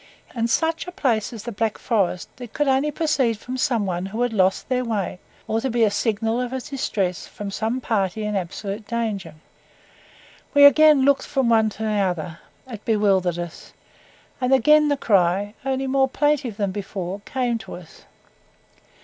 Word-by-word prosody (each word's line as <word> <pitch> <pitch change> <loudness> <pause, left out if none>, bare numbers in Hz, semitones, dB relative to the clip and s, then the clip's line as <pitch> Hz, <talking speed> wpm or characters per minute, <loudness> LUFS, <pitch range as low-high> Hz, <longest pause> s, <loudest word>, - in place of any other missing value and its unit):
In 230 -1 0
such 325 +7 0
a - - -5
place 255 - 0
as 225 -4 -8
the 240 - -5
Black 220 0 -1
Forest 195 -6 0
it 245 -3 -9
could 295 - 0
only 270 +2 +2
proceed 290 -7 0
from 250 +4 -7
some 240 -4 0
one 180 0 -2
who 220 +5 -2
had 245 -2 -1
lost 190 -2 +1
their 255 -1 0
way, 210 -6 -3 0.3
or 225 +1 0
be 240 -2 +1
a 215 - +3
signal 225 +2 0
of 250 - -2 0.2
distress 195 - -2
from 205 -1 -7
some 225 +5 -2
party 215 -3 -1
in 210 0 -2
absolute 200 +3 -4
danger. 210 -8 -3 1.2
We 285 0 +8
again 300 -1 +7
looked 280 -1 +2
from 265 -4 0
one 220 -1 +4
to 215 +1 -7
the 215 -1 0
other 175 -3 -2 0.3
it 225 -5 -9
bewildered 195 -5 +2
us; 175 -1 -8 0.7
and 250 +1 +1
again 300 +4 +5
the 285 -1 +1
cry, 200 -2 +2
only 270 0 -1
more 265 0 +2
plaintive 275 -6 0
than 200 -3 -1
before, 195 -1 -5
came 245 -3 -1
to 195 -3 -9
us. 175 -3 -14
225 Hz, 175 wpm, -23 LUFS, 200-260 Hz, 1.2 s, We